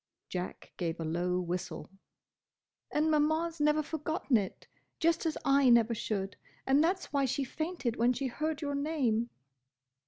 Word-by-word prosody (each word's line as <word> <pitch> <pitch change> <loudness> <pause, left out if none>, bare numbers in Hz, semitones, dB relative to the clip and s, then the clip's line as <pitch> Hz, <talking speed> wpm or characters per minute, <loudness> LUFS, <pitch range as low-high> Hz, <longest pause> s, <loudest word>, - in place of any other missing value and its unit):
Jack 180 0 -5
gave 170 -2 -2
a 165 - -3
low 175 +3 0
whistle. 180 0 -4 1.0
"And 310 +1 +2
Maman 315 +2 +2
's 330 - -16
never 300 +1 +3
forgotten 315 -3 -1
it, 200 -4 -1 0.3
just 335 0 +2
as 315 - -1
I 275 -1 +5
never 235 -1 +5
should. 195 -3 -3 0.3
And 275 +3 +4
that's 365 -1 -1
why 280 -1 +3
she 270 +2 0
fainted 285 -3 -3
when 235 +2 +4
she 270 +2 -2
heard 305 +4 -2
your 285 -1 -1
name." 275 -6 0
275 Hz, 155 wpm, -31 LUFS, 220-310 Hz, 1.0 s, I